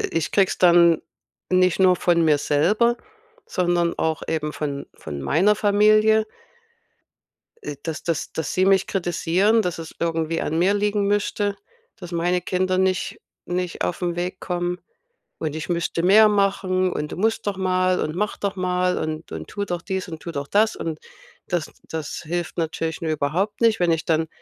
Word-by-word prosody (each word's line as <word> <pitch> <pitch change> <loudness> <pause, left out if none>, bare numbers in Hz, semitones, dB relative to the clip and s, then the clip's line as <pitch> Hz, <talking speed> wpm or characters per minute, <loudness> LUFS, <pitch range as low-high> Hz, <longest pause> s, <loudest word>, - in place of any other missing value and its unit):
i - - -3
ich 165 -1 -1
kriege 195 -2 +4
es - - -4
dann 170 -2 +5 0.5
nicht 185 0 +3
nur 185 -1 +5
von 170 -1 +2
mir 150 -2 +4
selber, 210 +13 +2 0.5
sondern 175 -2 0
auch 160 0 -1
eben 150 -1 -2
von 140 -2 -4
von 70 -2 -7
meiner 190 - +3
Familie 215 +1 +4 1.4
äh, - - -6
dass 160 -3 -5
dass 165 -2 -2
dass 160 -3 -3
sie 185 +1 +2
mich 195 0 +3
kritisieren, 190 +4 +1
dass 180 -3 -3
es 165 -1 -8
irgendwie 165 -1 -1
an 160 - -2
mir 190 +3 +3
liegen 205 0 +1
müsste, 205 0 0 0.4
dass 180 -4 -9
meine 175 +1 0
Kinder 185 +1 0
nicht 190 -1 0 0.3
nicht 180 -1 -3
auf 175 - -2
'n 175 -1 -1
Weg 180 +2 -3
kommen 175 0 -2 0.6
und 155 -2 -3
ich 155 - -5
müsste 170 -1 -1
mehr 215 +4 +7
machen 195 -2 +1
und: 150 0 -4
„Du - - -5
musst 220 +3 0
doch 200 -2 -1
mal 185 -1 +1
und 155 +1 -2
mach 210 +3 -1
doch 200 -1 -3
mal 180 0 0
und 155 0 -5
und - - -6
tu 205 -1 -3
doch 175 -3 -4
dies 190 -2 -3
und 160 -2 -7
tu 170 - -6
doch 140 -2 -4
das.” 215 +2 +2
Und 160 -2 -4 0.5
das 175 -3 -2 0.2
das 160 -2 -5
hilft 175 +1 -4
natürlich 160 0 -2
mir 160 -2 -1
überhaupt 170 +9 -1
nicht, 225 -4 +3
wenn 175 -1 +3
ich 160 0 -1
dann 160 0 +1
180 Hz, 180 wpm, -23 LUFS, 165-195 Hz, 1.4 s, mehr